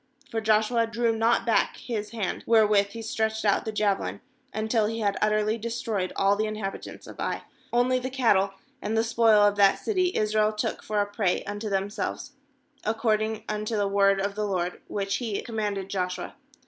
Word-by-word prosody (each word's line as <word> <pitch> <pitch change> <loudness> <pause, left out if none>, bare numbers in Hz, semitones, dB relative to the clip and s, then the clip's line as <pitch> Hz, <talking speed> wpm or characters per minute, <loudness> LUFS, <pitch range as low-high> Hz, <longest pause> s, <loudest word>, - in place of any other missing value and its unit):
26For 225 - -1
Joshua 220 +2 +3
drew 230 0 0
not 230 +1 +2
back 230 - +2
his 220 -5 -4
hand, 215 -5 -3
wherewith 215 -3 +5
he 225 +3 -8
stretched 220 0 -1
out 200 - +2
the 220 - -2
jave 210 -2 +1
lin, - - -5 0.3
until 215 0 +1
he 225 +1 -3
had 200 -2 +1
utterly 215 +1 +2
destroyed 225 -4 -2
all 195 +1 +3
the 215 +1 0
inhabitants 215 -2 -6
of - - -12
Ai. - - -2 0.3
270nly 250 +1 +2
the 255 - -3
cattle 205 -7 +2 0.3
and 220 +2 -1
the 225 - +3
spoil 225 -2 +4
of 205 0 +3
that 200 -1 +5
city 370 -4 0
Israel 215 0 +2
took 210 - -2
for 210 -1 0
a - - +1
prey 205 -2 0
unto 205 +1 -4
themselves, 200 +7 -2 0.5
ac 220 - 0
cording 220 -1 0
unto 215 +1 -2
the 205 -1 +1
word 195 0 +3
of 200 +1 -1
the 210 0 -2
LORD 180 -2 -2
which 195 0 -1
He 225 -5 -2
commanded 210 -4 -3
Joshua. 180 -2 -3
215 Hz, 185 wpm, -26 LUFS, 200-225 Hz, 0.5 s, wherewith